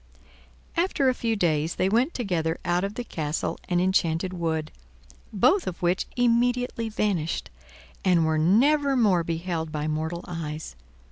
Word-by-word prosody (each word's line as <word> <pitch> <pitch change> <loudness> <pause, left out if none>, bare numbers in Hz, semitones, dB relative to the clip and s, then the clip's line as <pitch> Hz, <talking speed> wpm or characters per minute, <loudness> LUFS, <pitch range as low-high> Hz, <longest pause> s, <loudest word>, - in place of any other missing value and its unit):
After 330 -6 +2
a - - +2
few 230 -2 -1
days 160 -4 +1
they 185 - +1
went 240 - +1
together 175 -8 -1
out 175 +1 +1
of 200 +1 -3
the 245 - -3
castle 155 -8 -3
and 175 -1 +2
enchanted 180 -1 +1
wood, 160 -3 -2 0.6
both 325 - +3
of 180 - -4
which 175 +2 +1
immediately 245 -1 +1
vanished, 195 - -1 0.5
and 175 -4 +3
were 160 0 +1
nevermore 235 - +3
beheld 165 -1 -3
by 150 0 -2
mortal 160 +3 -3
eyes. 155 - -5
180 Hz, 140 wpm, -26 LUFS, 160-230 Hz, 0.6 s, both